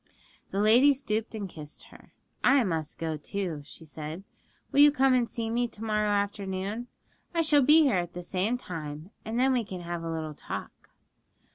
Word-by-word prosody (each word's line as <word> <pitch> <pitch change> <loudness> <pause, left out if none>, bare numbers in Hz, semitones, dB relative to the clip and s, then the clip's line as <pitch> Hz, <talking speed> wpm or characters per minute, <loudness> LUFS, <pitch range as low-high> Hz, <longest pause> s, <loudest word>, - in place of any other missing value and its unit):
The 195 - -2
lady 240 +7 +6
stooped 225 -4 -2
and 205 -2 -4
kissed 150 -4 -10
her. - - -17 0.3
'I 275 -2 +5
must 160 -6 -2
go 160 -1 -2
too,' 170 0 -4
she 160 +2 -13
said; 155 +4 -7 0.5
'will - - +2
you 295 0 +9
come 270 -2 +3
and 245 -2 +2
see 225 +1 -3
me 240 +2 0
to 220 -1 -9
morrow 210 -1 +1
afternoon? 200 +2 -2 0.5
I 335 - +3
shall 300 -2 +4
be 305 +4 +6
here 265 -10 +3
at 175 -1 -4
the 180 - -6
same 195 +7 0
time, 160 -4 -7
and 225 +2 -2
then 265 +1 +4
we 245 -2 +1
can 185 -4 -7
have 170 0 -4
a 165 - -4
little 160 -1 -4
talk.' - - -8
205 Hz, 190 wpm, -28 LUFS, 170-245 Hz, 0.5 s, you